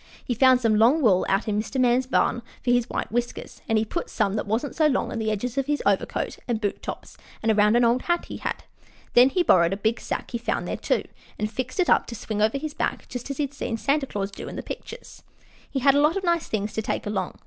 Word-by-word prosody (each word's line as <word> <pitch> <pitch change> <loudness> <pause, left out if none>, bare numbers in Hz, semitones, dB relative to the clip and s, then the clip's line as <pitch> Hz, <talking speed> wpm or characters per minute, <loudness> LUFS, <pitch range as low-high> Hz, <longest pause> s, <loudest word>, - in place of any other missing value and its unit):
He 245 - -1
found 255 +1 +5
some 225 -3 +2
long 265 +8 +4
wool 190 -6 +4
out 195 +4 +1
in 210 0 +1
Mr. 260 +4 -4
Man's 250 +1 +3
barn 240 -2 +1 0.2
for 245 - +2
his 245 0 +2
white - - -3
whiskers, 240 +1 -3
and 225 - +3
he 215 - +1
put 340 +10 -4
some 205 -3 0
that 210 - -2
wasn't 230 +7 -1
so 310 -2 +4
long 270 - 0
on 230 - -3
the 220 -1 -1
edges 235 +5 -2
of 270 - -2
his 295 0 0
overcoat - - 0
and 235 -3 0
boot 205 -2 -2
tops - - -7 0.3
and 225 - +3
around 210 +1 +4
an 240 0 +4
old 240 +2 +3
hat 345 0 0
he - - -7
had. - - -4 0.5
Then 245 +2 +7
he 360 +6 +1
borrowed 170 - +4
a - - -3
big 220 +3 0
sack - - -4
he 235 - -2
found 235 - -2
out - - -4
there, - - +1
too, - - -15 0.3
and 215 0 -2
fixed 255 - -4
it 365 - +3
up - - +3
to 235 - -6
swing 215 -2 -4
over 220 +5 +2
his 300 +1 -5
back, - - -2
just 250 +2 -6
as 275 - -4
he 295 - +1
had 280 0 -4
seen 230 -5 -3
Santa 280 +3 0
Claus 200 -3 -3
do - - -8
in - - -8
the - - -5
pictures. - - -9 0.5
He 270 - -2
had 275 +1 +5
a 285 - +4
lot 305 +5 +3
of 390 - -3
nice 340 -2 +1
things 210 -1 -2
to 220 - -1
take - - -3
along. 195 -3 -2
240 Hz, 270 wpm, -25 LUFS, 215-275 Hz, 0.5 s, Then